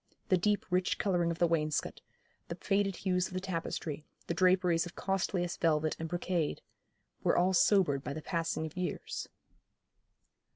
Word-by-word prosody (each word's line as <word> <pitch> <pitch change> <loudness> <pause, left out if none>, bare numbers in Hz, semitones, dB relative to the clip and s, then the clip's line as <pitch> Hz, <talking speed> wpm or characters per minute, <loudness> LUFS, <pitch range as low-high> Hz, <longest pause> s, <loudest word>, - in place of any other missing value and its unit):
The 185 - +5
deep 205 +3 +1
rich 180 0 +1
colouring 175 -4 +1
of 170 - -2
the 175 - +4
wainscot, 155 -3 -1 0.5
the 170 - -4
faded 195 +1 0
hues 180 -1 0
of 185 - -10
the - - 0
tapestry, 165 -4 -4 0.2
the - - -2
draperies 180 -1 +3
of 175 - -12
costliest 185 -2 -1
velvet 155 -2 +2
and 165 0 -4
brocade, 175 -2 -1 0.6
were - - +2
all 185 +2 +3
sobered 175 -7 +4
by 140 - -4
the 155 +1 -6
passing 165 -3 -1
of 155 - -8
years. 180 -1 -4
175 Hz, 160 wpm, -32 LUFS, 165-185 Hz, 0.6 s, The